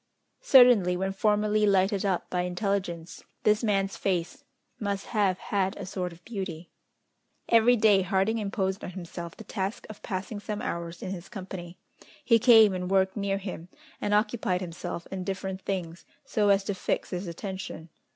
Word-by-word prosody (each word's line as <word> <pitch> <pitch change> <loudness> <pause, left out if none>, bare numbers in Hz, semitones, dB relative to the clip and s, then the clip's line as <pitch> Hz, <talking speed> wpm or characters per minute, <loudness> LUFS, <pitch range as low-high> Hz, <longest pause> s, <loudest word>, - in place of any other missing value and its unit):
Certainly, 240 -9 +6
when 190 +1 -1
formerly 210 +1 +2
lighted 195 0 +2
up 185 -3 -1
by 180 - +1
intelligence, 180 -2 -3 0.2
this 210 +2 +3
man's 195 -3 0
face 175 -3 -2 0.4
must 200 -2 -2
have 200 -4 +2
had 195 0 -1
a 200 - -6
sort 180 -1 -3
of 170 +1 -16
beauty. 190 -7 -6 0.8
Every 235 +1 +6
day, 210 -3 +5
Harding 195 +4 +1
imposed 195 -2 -2
on - - -4
himself 170 -2 -7
the - - -9
task 200 -1 -4
of 210 - -13
passing 195 +1 -4
some 210 0 -4
hours 170 0 -4
in 185 - -4
his 180 -1 -7
company. 185 -4 -8 0.5
He 230 -2 +5
came 225 -3 +7
and 180 -1 -3
worked 190 0 +2
near 200 -2 -1
him, 185 -4 -7 0.3
and 205 - -1
occupied 210 -3 +1
himself 170 -1 -5
in 190 -1 -4
different 190 0 -4
things, 180 -4 -4 0.2
so 210 -2 +1
as 195 0 +4
to 200 - -2
fix 190 - -2
his 180 +1 -4
attention. 180 -1 -6
195 Hz, 165 wpm, -28 LUFS, 180-210 Hz, 0.8 s, came